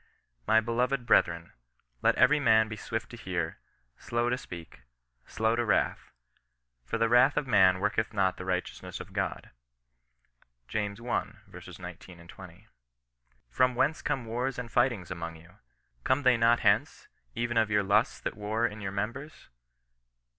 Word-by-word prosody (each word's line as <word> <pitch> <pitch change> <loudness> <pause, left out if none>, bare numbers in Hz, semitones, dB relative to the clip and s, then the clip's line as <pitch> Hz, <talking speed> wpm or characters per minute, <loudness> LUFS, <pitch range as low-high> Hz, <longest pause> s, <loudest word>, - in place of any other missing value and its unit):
My 110 - +5
beloved 120 +3 -1
brethren, 85 -6 +2 0.5
let - - +3
every 150 0 +4
man 110 -5 +4
be 110 - -6
swift 110 +1 -5
to 120 - -9
hear, 85 -6 -4 0.4
slow 120 0 -1
to 125 - 0
speak, 85 -7 -10 0.5
slow 110 +1 0
to 120 - 0
wrath: 110 - 0 0.7
for 90 - -3
the 115 0 +2
wrath 125 +5 +4
of 150 - +1
man 95 -6 +4
worketh 105 +2 0
not 95 -3 +1
the - - -6
righteousness 90 -1 -4
of - - -10
God." - - -3 1.2
James 105 -1 -3
i. 120 0 -2
19, 85 -1 -11
20. 95 +3 -13 0.4
" - - -43
From 130 - +2
whcTice 140 +5 +1
come 130 -4 -2
wars 125 +4 -2
and 120 -2 -6
fightings 120 -8 +1
among 85 -2 -5
you? 85 +2 -17 0.5
Come 130 +2 +1
they 130 -1 +5
not 115 +1 +3
hence, - - +1 0.3
even 120 0 -1
of 110 -1 +3
your 105 -1 +2
lusts 105 +3 +2
that - - -4
war 110 +2 -1
in 105 -2 -4
your 95 - -3
members 115 +10 -5
110 Hz, 155 wpm, -29 LUFS, 95-120 Hz, 1.2 s, My